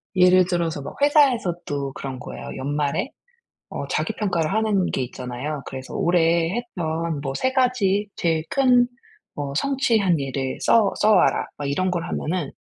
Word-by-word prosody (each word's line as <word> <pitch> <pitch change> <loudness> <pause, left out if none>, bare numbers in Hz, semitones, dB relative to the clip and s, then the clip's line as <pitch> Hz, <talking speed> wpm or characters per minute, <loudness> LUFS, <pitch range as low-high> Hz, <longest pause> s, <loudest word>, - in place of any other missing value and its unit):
예를 185 0 +6
들어서 170 -4 -1
막 - - -8
회사에서도 190 - +2
그런 135 -2 -6
거예요. - - -8
연말에 145 - -1 0.6
어 - - -5
자기 - - -1
평가를 175 -7 -1
하는 210 -3 +1
게 - - -2
있잖아요. 125 +4 -5
그래서 130 0 -7
올해 170 +1 +2
했던 165 -9 -3
뭐 135 -1 -3
3 260 - 0
가지 220 -6 +2
제일 165 -2 0
큰 250 -3 +4 0.5
뭐 140 -1 -4
성취한 225 - +2
일을 135 -1 -3
써 220 -4 +4
써와라 215 0 +3
막 145 - -6
이런 185 +6 0
걸 175 -2 -2
하면은 165 -3 -3
175 Hz, 295 characters per minute, -23 LUFS, 145-215 Hz, 0.6 s, 예를